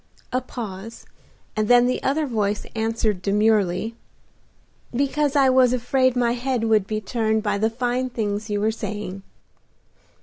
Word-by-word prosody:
A 255 - +1
pause, 225 -3 -8 0.5
and 215 -1 0
then 245 +1 +6
the 255 - 0
other 300 +3 +1
voice 210 -5 -1
answered 220 -3 0
demurely, 210 0 +1 1.0
"Because 280 +3 0
I 275 -2 +5
was 255 -1 +4
afraid 255 +1 +2
my 240 -1 +2
head 245 0 -1
would 215 -3 +2
be 215 0 -2
turned 220 +1 0
by 205 -2 0
the 220 +2 +2
fine 245 +2 -1
things 215 -2 -3
you 205 0 0
were 215 +1 +2
saying." 210 -3 -5
225 Hz, 145 wpm, -23 LUFS, 210-250 Hz, 1.0 s, then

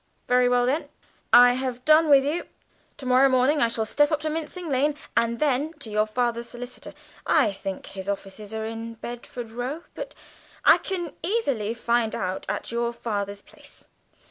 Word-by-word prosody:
"Very 250 0 +4
well 245 0 +3
then, 280 +6 -1 0.4
I 245 0 +8
have 255 0 -4
done 310 +1 +6
with 275 -1 +6
you. 320 +5 -2 0.5
To 275 - -9
morrow 255 +2 +5
morning 260 +3 +3
I 235 - +5
shall 230 -1 -1
step 290 +6 +2
up 305 - +1
to 310 0 -2
Mincing 325 +3 -4
Lane, 285 +1 +1 0.2
and 235 0 +2
then 295 +2 0
to 290 -9 -7
your 210 +1 +2
father's 235 +1 -1
solicitor. 245 +1 -9 0.3
I 280 -10 +4
think 195 -1 -6
his 190 0 -7
offices 200 +1 -5
are 220 0 -3
in 225 +1 -6
Bedford 240 0 -7
Row, 255 +8 -4
but - - -7 0.5
I - - +7
can 350 -5 -4
easily 275 - -1
find 235 -1 0
out 185 0 -3
at - - -3
your 235 0 0
father's 205 -3 -4
place. - - -13
245 Hz, 175 wpm, -25 LUFS, 225-290 Hz, 0.5 s, I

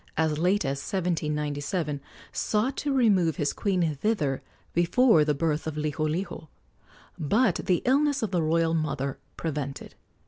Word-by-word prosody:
as 155 -2 +1
late 185 +5 +2
as 135 0 -1
1797, 150 -3 -2 0.3
sought 225 +6 0
to 290 - -2
remove 200 - +3
his 145 -1 0
queen 180 -6 0
thither 150 -8 0 0.3
before 175 +1 +4
the 150 -1 +1
birth 155 +1 -1
of 155 -1 -4
Liholiho, 155 +3 -2 0.7
but 200 - +2
the 180 -3 +2
illness 285 +1 +2
of 210 - -1
the 175 -3 +1
royal 165 +1 +2
mother 140 -4 -2 0.2
prevented. 145 -4 -4
165 Hz, 135 wpm, -27 LUFS, 150-200 Hz, 0.7 s, before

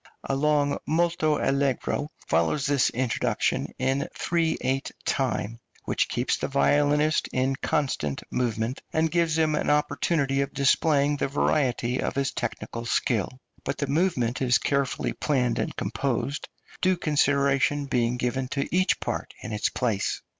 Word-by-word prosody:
A 135 - -1
long 145 0 +2
molto 160 -1 +2
allegro 140 +2 0 0.2
follows 85 - +1
this 140 -2 +3
introduction, 125 -1 -1
in 135 +2 0
3 165 -2 0
8 130 +1 -1
time, 110 +6 -1 0.3
which - - 0
keeps 120 +2 0
the - - -2
violinist 145 +2 +2
in 130 +1 +1
constant 130 - -1
movement, 120 0 -1
and 160 0 +1
gives 170 -2 +2
him 160 -1 +2
an 150 - 0
opportunity 150 -1 +1
of 140 - -4
displaying 145 +1 +3
the - - 0
variety 130 -3 0
of - - -2
his 140 -1 0
technical 115 -1 -4
skill; 115 - 0 0.3
but - - -3
the 140 - -1
movement 140 -6 0
is 125 -2 +4
carefully 140 -2 -1
planned 130 -5 0
and - - -2
composed, 140 +2 -2 0.3
due 185 -1 +3
consideration 145 -2 +2
being 125 -2 0
given 125 +1 -1
to 140 +1 -2
each 185 0 +2
part - - -4
in - - -5
its 105 - 0
place. 115 -6 -1
140 Hz, 145 wpm, -26 LUFS, 125-150 Hz, 0.3 s, is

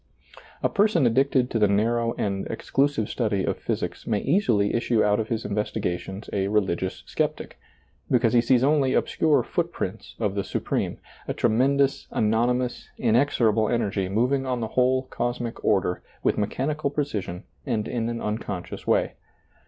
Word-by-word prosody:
A - - +5
person 200 -8 +2
addicted 130 +1 +2
to 115 - 0
the 105 - +5
narrow 115 +3 +1
and 100 -1 -2
exclu 135 +5 +1
sive 110 -7 -3
study 105 -5 -1
of - - -2
physics - - -3
may 110 - +1
easily 120 - +2
issue 115 -1 +2
out 105 +1 +2
of 110 - -1
his 115 -1 -2
investigations 100 -1 -3
a 95 -1 0
religious 95 -3 -1
sceptic, - - -3 0.5
because 120 -2 +3
he 120 - +6
sees 125 +1 +3
only 140 -2 +3
obscure 150 -6 +2
footprints - - -3
of 105 -4 -1
the 100 -1 -1
Supreme, - - -2 0.3
a - - -2
tre 120 - +2
mendous, 135 +4 +2
anonymous, 120 +3 0
inexorable 115 -3 +2
energy 100 -5 0
moving 125 +7 +1
on 130 -2 -2
the 110 -2 -3
whole 130 +2 +2
cosmic 120 -2 -4
order 95 -3 +1 0.2
with - - +2
mechanical 140 +8 -1
pre 145 +1 0
cision 95 -7 -5 0.2
and 110 -4 -1
in 115 -1 -2
an 115 0 -3
unconscious 105 -4 -4
way. - - +2
115 Hz, 160 wpm, -25 LUFS, 105-130 Hz, 0.5 s, he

